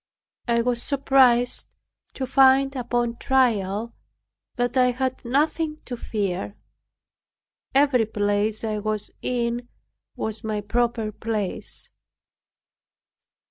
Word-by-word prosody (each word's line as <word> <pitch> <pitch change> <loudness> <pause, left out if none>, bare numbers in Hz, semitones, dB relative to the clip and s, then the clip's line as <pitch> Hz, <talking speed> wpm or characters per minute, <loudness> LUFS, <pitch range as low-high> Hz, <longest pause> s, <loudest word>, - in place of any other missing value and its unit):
I 235 -1 +2
was 240 -1 0
surprised 260 -3 +3 0.4
to 265 - -2
find 270 +1 +4
upon 240 -1 -1
trial 230 -5 +1 0.6
that 245 0 -1
I 250 -1 +5
had 255 +1 -2
nothing 305 +5 0
to 250 - -5
fear. 200 -4 -3 1.2
Every 270 -5 +4
place 205 +1 0
I 215 -1 -1
was 215 0 -2
in 240 0 -2 0.5
was 220 +1 -4
my 215 -1 -2
proper 235 0 0
place. 215 -2 -2
240 Hz, 100 wpm, -24 LUFS, 215-260 Hz, 1.2 s, I